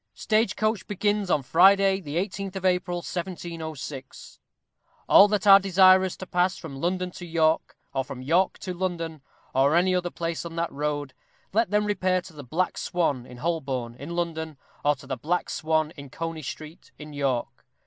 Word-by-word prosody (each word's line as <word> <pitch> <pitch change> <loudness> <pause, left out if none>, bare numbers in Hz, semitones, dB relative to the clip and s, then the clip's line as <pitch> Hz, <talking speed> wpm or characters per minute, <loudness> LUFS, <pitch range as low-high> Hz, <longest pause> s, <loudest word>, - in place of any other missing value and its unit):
Stage 215 -2 +1
Coach 215 -2 -1
begins 205 -1 0
on 150 -5 +2
Friday, 195 +6 +5
the 150 -3 -6
18th 195 +1 -3
of 190 -1 -4
April, 180 -1 +1
1706. 165 -6 -6 0.7
All 200 - +8
that 210 -1 -1
are 195 -1 +9
desirous 190 -1 +5
to 185 - -7
pass 180 +1 +1
from 160 -5 -8
London 180 +1 -1
to 175 - -10
York, 160 -1 +1 0.2
or 135 - 0
from 130 -2 -8
York 175 +7 +2
to 185 - -5
London, 170 -4 -3 0.3
or 140 +4 +3
any 180 +2 +3
other 180 -1 0
place 170 -1 -4
on 170 -1 -7
that 170 0 -1
road, 145 -1 -3 0.4
let 225 0 +2
them 210 +1 +2
repair 185 -3 +1
to 180 -1 -12
the 145 -2 -9
Black 165 +9 -1
Swan, 145 -8 -1
in 125 - -11
Holborn, 135 -6 -2
in 140 +8 -7
London, 160 -3 -3 0.3
or 145 0 +3
to 140 - -15
the 130 - -4
Black 165 +9 -1
Swan, 155 -1 0
in 140 -4 -11
Coney 165 +2 -5
Street, 155 +3 -9
in 150 0 -10
York. 135 -4 -2
170 Hz, 180 wpm, -26 LUFS, 150-185 Hz, 0.7 s, are